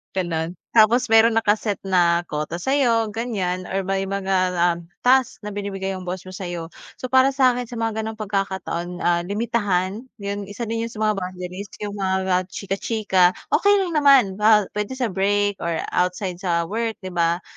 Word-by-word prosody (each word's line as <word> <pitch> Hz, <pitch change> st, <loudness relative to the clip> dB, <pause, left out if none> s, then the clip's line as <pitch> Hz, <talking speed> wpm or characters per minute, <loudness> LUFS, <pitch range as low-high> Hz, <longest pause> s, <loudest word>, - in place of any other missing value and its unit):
Gano'n. 170 Hz, -2 st, -2 dB, 0.2 s
Tapos 235 Hz, +2 st, +4 dB
meron 225 Hz, 0 st, +6 dB
na 225 Hz, -, +2 dB
ka-set 210 Hz, -1 st, 0 dB
na 175 Hz, -3 st, +3 dB
quota 150 Hz, +2 st, -3 dB
sa'yo, 230 Hz, +1 st, +1 dB
ganyan, 195 Hz, -6 st, -3 dB
or 195 Hz, +1 st, -2 dB
may 195 Hz, +1 st, -1 dB
mga, 190 Hz, -2 st, 0 dB, 0.2 s
um, 170 Hz, 0 st, -7 dB, 0.2 s
task 255 Hz, -2 st, +3 dB
na 210 Hz, -, -5 dB
binibigay 195 Hz, -1 st, -4 dB
'yong 185 Hz, -1 st, -6 dB
boss 180 Hz, 0 st, -4 dB
mo 185 Hz, -, -10 dB
sa'yo. 175 Hz, -3 st, -6 dB, 0.2 s
So, 255 Hz, -, -7 dB
para 265 Hz, +1 st, +4 dB
sa'kin 250 Hz, -2 st, +2 dB
sa 240 Hz, -, -8 dB
mga 225 Hz, -1 st, -2 dB
gano'ng 220 Hz, 0 st, -4 dB
pagkakataon, 190 Hz, -4 st, -3 dB
ah, 175 Hz, 0 st, +3 dB
limitahan, 205 Hz, 0 st, -1 dB
'yon 200 Hz, -1 st, -5 dB
isa 205 Hz, +4 st, -6 dB
din 230 Hz, 0 st, -2 dB
'yon -, -, -11 dB
sa 215 Hz, -, -2 dB
mga 215 Hz, -2 st, +1 dB
boundaries, 180 Hz, +1 st, -6 dB, 0.2 s
'yong 205 Hz, -1 st, -4 dB
mga, 190 Hz, -1 st, +1 dB, 0.2 s
ah, 180 Hz, 0 st, +3 dB
chika-chika, 195 Hz, -1 st, +1 dB, 0.2 s
okay 405 Hz, 0 st, +4 dB
lang 355 Hz, -, -4 dB
naman, 260 Hz, -9 st, +5 dB
ba 210 Hz, 0 st, +5 dB
puwede 210 Hz, +4 st, -3 dB
sa 250 Hz, -5 st, -1 dB
break 205 Hz, +1 st, +1 dB
or 170 Hz, 0 st, -2 dB, 0.2 s
outside 180 Hz, 0 st, -1 dB
sa 170 Hz, -3 st, 0 dB
work, 225 Hz, +5 st, -2 dB
'di 185 Hz, -, -5 dB
ba? 170 Hz, 0 st, 0 dB
200 Hz, 180 wpm, -22 LUFS, 180-225 Hz, 0.2 s, meron